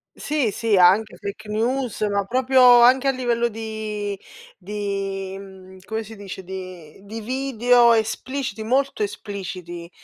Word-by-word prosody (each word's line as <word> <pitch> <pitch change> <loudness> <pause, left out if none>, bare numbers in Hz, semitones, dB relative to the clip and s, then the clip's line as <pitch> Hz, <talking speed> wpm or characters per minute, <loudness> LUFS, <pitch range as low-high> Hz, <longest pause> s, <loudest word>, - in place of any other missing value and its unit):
.Sì, 290 -8 -1
sì, 215 -1 +1
anche 195 +5 +4
fake 210 +1 -7
news, 235 +2 -1
ma 200 -1 +1
proprio 250 +1 +5
anche 260 +3 +5
a - - +5
livello 240 -2 0
di 215 -2 -5 0.4
di 195 -1 -4
mhmm, 190 -1 -13
come 220 +1 -3
si 220 +1 -11
dice, 195 -2 -8
di 185 -3 -9 0.2
video 245 -1 +3
espliciti, 230 +2 -2
molto 265 +1 0
espliciti.. 185 -4 -6
215 Hz, 125 wpm, -22 LUFS, 195-245 Hz, 0.4 s, proprio